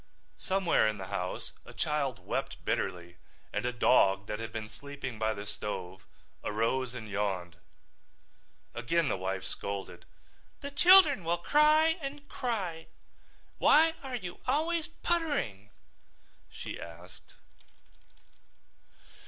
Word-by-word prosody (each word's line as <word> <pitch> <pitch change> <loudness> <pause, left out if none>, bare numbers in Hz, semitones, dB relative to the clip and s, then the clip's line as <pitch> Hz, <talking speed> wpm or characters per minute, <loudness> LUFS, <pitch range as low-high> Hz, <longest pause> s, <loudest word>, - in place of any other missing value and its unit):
Somewhere 190 - +2
in 110 -1 -1
the 95 -2 -7
house 90 -2 -3
a - - -13
child 140 -10 -1
wept - - -3
bitterly 85 -1 -2 0.4
and 120 - -1
a - - +1
dog 100 -5 +4
that 105 +2 -4
had 115 0 -5
been 110 -1 -5
sleeping 130 0 -7
by 110 0 +1
the 100 - -6
stove 95 -3 -6 0.4
arose 120 +4 0
and 110 -3 -6
yawned. 95 -4 -2 1.2
Again 140 +6 +1
the - - +1
wife 95 0 -3
scolded. 100 -1 -5 0.6
"The 280 - -5
children 310 - +7
will 170 +1 +1
cry 305 - +4
and 285 +1 -6
cry. 190 -10 -3 0.7
Why 320 +2 +6
are 265 -2 -5
you 180 -7 -6
always 315 +4 +1
puttering?" 295 - -2 0.8
she - - -7
asked. 85 +2 -12
125 Hz, 120 wpm, -31 LUFS, -, 1.2 s, children